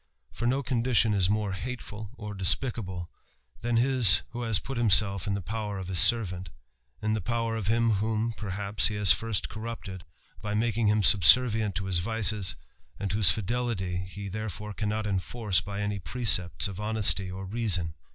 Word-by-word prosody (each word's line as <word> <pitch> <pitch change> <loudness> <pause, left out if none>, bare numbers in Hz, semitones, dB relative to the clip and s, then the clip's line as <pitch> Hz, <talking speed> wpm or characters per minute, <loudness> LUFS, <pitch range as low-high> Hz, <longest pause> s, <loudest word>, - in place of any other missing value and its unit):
For 120 - -4
no 135 +3 0
condition 120 -4 +1
is 95 -2 +1
more 105 -1 -1
hateful 110 0 -7
or 105 -3 -8
despicably 95 -2 -2 0.6
than 120 0 -1
his 120 - +4
who 120 0 -6
has 115 -3 +1
put 135 +6 -6
himself 100 -4 +3
in 100 - -1
the 100 - -5
power 105 0 -5
of 95 -1 -7
his 90 -3 +3
servant; 95 -6 +3 0.5
in 110 0 0
the 110 - -2
power 115 +3 -2
of 110 -4 -4
him 115 +1 +2
whom, 110 +2 -1
perhaps, 100 -1 -1
he 105 - -3
has 105 -3 +4
first 115 -5 -1
cornipteci 110 -4 -8 0.4
by 105 0 -4
making 115 0 0
him 105 0 +2
subservient 110 +2 +5
to 95 - -3
his 95 -2 +1
vices, 105 -2 +1 0.4
and 100 -2 -3
whose 100 -4 +5
fidelit| 115 +3 -2 0.3
he 100 +2 -8
therefore 105 0 -6
cannot 105 +1 -3
enforce 100 -1 -1
by 100 +1 -6
any 105 -1 -3
precepts 90 +1 +1
of 95 -1 -8
honesty 105 -3 +2
o 95 - -8
reason. 95 -5 -1
105 Hz, 170 wpm, -27 LUFS, 95-115 Hz, 0.6 s, subservient